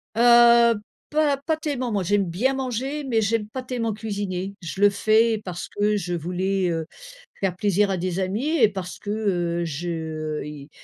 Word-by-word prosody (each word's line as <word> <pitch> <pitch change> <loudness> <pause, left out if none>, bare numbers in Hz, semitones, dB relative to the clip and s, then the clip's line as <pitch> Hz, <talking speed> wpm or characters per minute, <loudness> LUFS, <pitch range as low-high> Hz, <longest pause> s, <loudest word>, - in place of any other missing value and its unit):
Heu, 235 0 +6 0.3
pas 295 -2 +2
pas 310 +3 -1
tellement. 265 -6 -3
Moi 200 -3 0
j'aime 200 +2 +2
bien 245 +11 +1
manger, 265 +3 -3
mais 230 -4 +1
j'aime 210 0 0
pas 255 +4 -6
tellement 235 -4 -2
cuisiner. 200 -3 -4
Je 190 +3 -6
le 205 - +7
fais 220 +2 +2
parce 175 -1 -5
que 210 +1 +1
je 175 -3 -3
voulais, 180 +2 -1
heu, 165 -1 -2 0.5
faire 190 -3 -1
plaisir 205 0 +2
à 190 - +1
des 180 +1 -2
amis 200 +9 -1
et 225 -5 +6
parce 190 -2 -6
que, 205 - -8
heu, 175 -5 -1
je, 165 +3 -4
heu, 155 -2 -4
i 150 -1 -9
205 Hz, 185 wpm, -24 LUFS, 180-235 Hz, 0.5 s, le